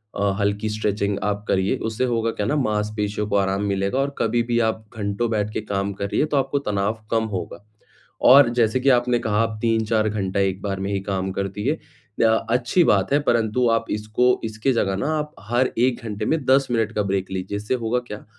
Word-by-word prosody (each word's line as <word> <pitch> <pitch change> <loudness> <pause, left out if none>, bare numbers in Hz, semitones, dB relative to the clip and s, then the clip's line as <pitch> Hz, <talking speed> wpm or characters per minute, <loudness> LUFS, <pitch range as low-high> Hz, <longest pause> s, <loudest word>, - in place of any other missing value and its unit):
अ, 100 -1 +1
हल्की 100 +1 0
स्ट्रेचिंग 105 -2 -1
आप 105 0 -1
करिए, 95 +1 +1
उससे 110 +2 -2
होगा 115 -2 0
क्या 105 - -3
ना, 150 - +1
माँसपेशियों 105 -4 -1
को 100 - 0
आराम 95 +1 0
मिलेगा 100 +4 -1
और 140 0 -1
कभी 115 +1 +1
भी 120 0 -1
आप 110 0 -5
घंटों 100 +3 -1
बैठ 105 -1 -1
के - - -2
काम 100 -1 -2
करिए, 100 +8 -1
तो 150 -2 -1
आपको 135 +1 0
तनाव 105 -2 -1
कम 115 -1 +2
होगा। 95 +2 -6 0.6
और 130 -1 +8
जैसे 115 +2 +2
कि 135 +2 +2
आपने 120 -1 +3
कहा 105 -1 0
आप 115 -1 -1
3-4 110 -1 +1
घंटा 100 -2 -2
एक 95 -1 0
बार 100 -2 -3
में 100 - -2
ही 100 - 0
काम 95 -1 -2
करती 100 +4 -3
हैं। 155 - +1 0.5
अ, 110 0 +2
अच्छी 125 +8 +3
बात 100 +4 +2
है 145 - +4
परंतु 115 +1 +2
आप 115 0 +1
इसको 125 +4 +1
इसके 110 +4 -1
जगह 95 -4 0
ना 140 - -1
आप 150 0 -4 0.2
हर 120 +2 +2
1 125 +1 +1
घंटे 105 0 -4
में 155 +1 0
10 135 +1 +4
मिनट 115 -3 +1
का 105 - +1
ब्रेक 95 -1 -2
लीजिए। 95 +2 -3
इससे 105 +4 -3
होगा 120 +2 +1
क्या? 105 - -8
110 Hz, 210 wpm, -22 LUFS, 100-120 Hz, 0.6 s, और